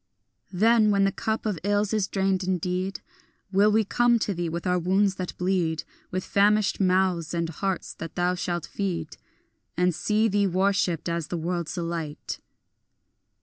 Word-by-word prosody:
Then, 215 +3 +4
when 200 -1 +3
the 195 - +3
cup 220 +3 -2
of 205 -6 -1
ills 205 +1 +1
is 210 -3 +1
drained 190 -1 0
indeed, 185 +1 -2 0.5
Will 205 +2 +4
we 220 +1 +3
come 240 +3 +3
to 215 -2 -1
thee 175 -1 -2
with 170 +1 -4
our 180 0 +2
wounds 190 +3 +2
that 180 -1 -5
bleed, 180 -3 0 0.3
With 185 0 -3
famished 205 0 +2
mouths 185 -3 +1
and 170 -1 0
hearts 190 +3 -3
that 165 -1 -8
thou 180 0 +1
shalt 175 -2 -2
feed, 170 -6 -3 0.6
And 180 0 +3
see 215 +6 +1
thee 205 -1 +2
worshipped 190 -2 +1
as 170 -2 -2
the 175 - -3
world's 170 0 -3
delight. 165 -3 -4
185 Hz, 160 wpm, -26 LUFS, 175-200 Hz, 0.6 s, Then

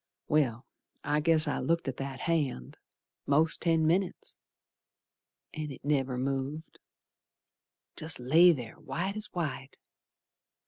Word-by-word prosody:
Well, 130 -5 +1 0.4
I 150 +1 +1
guess 160 0 +3
I 145 - -1
looked 165 -2 0
at 130 - -3
that 135 -1 -5
hand 145 - -1 0.5
Most 155 +3 +3
ten 165 -2 +2
minits, 180 +3 0 1.2
An' 155 -1 -4
it 135 - -10
never 135 -3 0
moved, 135 +4 -3 1.2
Jest 155 -3 -3
lay 160 +8 +6
there 125 -8 -5
white 180 +9 -3
as 215 0 0
white. 145 -6 -5
150 Hz, 120 wpm, -30 LUFS, 135-165 Hz, 1.2 s, lay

